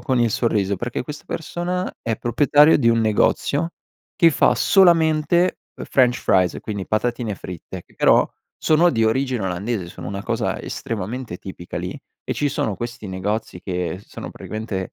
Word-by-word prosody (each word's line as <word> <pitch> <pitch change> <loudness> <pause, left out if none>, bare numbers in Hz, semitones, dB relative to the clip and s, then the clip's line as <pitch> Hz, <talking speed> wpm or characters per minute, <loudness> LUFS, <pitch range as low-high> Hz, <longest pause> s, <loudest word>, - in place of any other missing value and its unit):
con 130 -3 0
il 120 -1 +3
sorriso, 100 -4 +1
perché 120 +5 -3
questa 150 +4 -8
persona 175 +3 -3
è 115 -1 -1
proprietario 145 +7 +4
di 120 -5 +3
un 115 0 +2
negozio, 140 +8 +1 0.4
che 165 - +5
fa - - +3
solamente, 170 -1 +4 0.2
uhm, - - -6
french 125 -2 +3
fries, 90 -2 +2
quindi 100 -3 -5
patatine 115 0 -1
fritte, 90 0 -8
che - - -25
però - - +4 0.3
sono 165 +3 +4
di 115 -5 +1
origine 125 -1 0
olandese, 95 +1 -2
sono - - -8
una 100 0 -5
cosa - - -2
estremamente 115 -2 -5
tipica 90 -2 -7
lì, - - -5 0.3
e - - -2
ci 145 - 0
sono 110 -5 -1
questi 120 0 -6
negozi 95 0 -3
che 90 -1 -3
sono, - - -8
praticamente, 110 -4 -5
115 Hz, 160 wpm, -22 LUFS, 100-145 Hz, 0.4 s, che